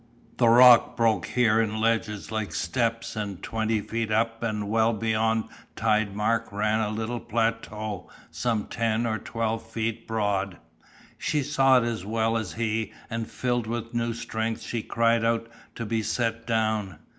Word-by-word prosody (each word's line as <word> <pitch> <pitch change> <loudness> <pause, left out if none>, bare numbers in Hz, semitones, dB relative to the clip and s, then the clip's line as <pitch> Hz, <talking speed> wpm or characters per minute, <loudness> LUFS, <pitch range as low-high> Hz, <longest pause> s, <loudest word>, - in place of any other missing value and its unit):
The 120 -2 +5
rock 120 0 +7
broke 115 -2 +2
here 115 -3 +3
in 110 -1 -1
ledges 110 -2 0
like 110 -6 -3
steps 115 +9 -1
and 100 -4 -4
twenty 110 -1 0
feet 115 +1 -3
up 115 +1 +1
and 105 -3 -2
well 110 +2 +2
beyond 110 +1 +1 0.3
tide 110 -2 +1
mark 115 +2 0
ran 105 +2 +1
a 110 -2 0
little 110 +3 -3
plateau 110 -4 -2 0.2
some 115 -4 -1
ten 115 0 0
or 110 -2 -1
twelve 115 +1 -2
feet 115 0 -4
broad. 100 -4 -1 0.6
She 150 -2 0
saw 135 -2 +4
it 125 - +3
as 115 -5 -2
well 110 +2 0
as 110 -4 -2
he 110 -1 -1 0.2
and 115 0 -3
filled 120 -2 -1
with 115 0 -4
new 115 -1 -1
strength 110 0 -3
she 115 - -3
cried 115 +1 +2
out 115 0 +1 0.3
to 115 - -4
be 110 +1 0
set 115 +1 -2
down. 110 -3 0
115 Hz, 160 wpm, -26 LUFS, 110-115 Hz, 0.6 s, rock